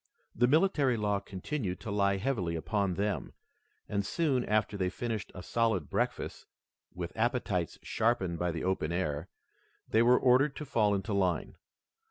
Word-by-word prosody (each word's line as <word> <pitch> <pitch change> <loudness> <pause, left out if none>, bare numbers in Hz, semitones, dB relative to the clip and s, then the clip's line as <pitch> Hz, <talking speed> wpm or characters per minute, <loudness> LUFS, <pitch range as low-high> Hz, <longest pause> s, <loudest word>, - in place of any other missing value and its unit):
The 120 +2 +3
military 145 -4 +3
law 105 -2 +1
continued 100 0 -4
to 110 - -5
lie 100 -1 +2
heavily 95 -7 -1
upon 95 +3 0
them, 100 +1 -2 0.5
and, 100 -1 -1
soon 135 +2 +1
after 105 0 +1
they 95 -2 0
finished 110 +1 -4
a 90 - -7
solid 110 -10 0
breakfast - - -2 0.4
with 90 -1 -6
appetites 110 - 0
sharpened 100 -7 0
by 90 - 0
the 80 -1 -4
open 95 -4 0
air, 80 -2 -2 0.6
they 110 - +3
were 125 +2 +6
ordered 135 +3 +4
to 150 - -6
fall 110 -7 +2
into 100 +2 -2
line. 95 -3 0
105 Hz, 155 wpm, -31 LUFS, 90-120 Hz, 0.6 s, were